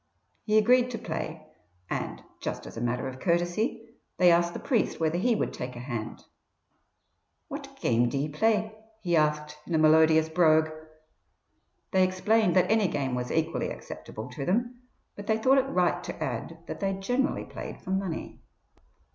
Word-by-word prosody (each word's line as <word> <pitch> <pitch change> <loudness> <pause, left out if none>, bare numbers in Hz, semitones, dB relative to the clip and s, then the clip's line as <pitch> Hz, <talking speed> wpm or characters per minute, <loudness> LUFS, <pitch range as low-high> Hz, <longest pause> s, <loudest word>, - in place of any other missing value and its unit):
He 215 -1 +3
agreed 250 +3 +5
to 240 - -4
play, 160 -4 -5 0.4
and, - - -4 0.2
just - - -4
as - - -10
a 115 - -5
matter 120 +2 -1
of 130 0 -7
courtesy, 175 - 0 0.3
they 180 -1 +6
asked 170 0 +2
the - - -3
priest 240 -6 0
whether 165 +1 +1
he 235 +4 +2
would - - -1
take 125 0 -6
a - - -7
hand. 120 -3 -5 1.3
"What - - -8
game 120 +1 +2
d'ye 140 +4 -1
play?" 215 +7 +1 0.3
he 175 -1 +1
asked, 150 -1 +1
in 170 - -1
a - - +4
melodious 160 0 +5
brogue. 160 -1 +4 1.2
They 190 -1 +4
explained 185 +2 +2
that 185 +2 +4
any 220 -3 +4
game 140 -5 -2
was 125 0 -2
equally 160 0 0
acceptable 110 +3 -8
to 135 +2 -5
them, 240 - -1 0.3
but 205 - -9
they 220 - +2
thought 260 +5 +4
it 270 +1 -1
right 180 -8 +1
to - - -6
add - - -4
that - - -6
they 195 -1 0
generally 245 +8 -1
played - - -8
for - - -5
money. 190 -3 -3
175 Hz, 170 wpm, -28 LUFS, 155-215 Hz, 1.3 s, they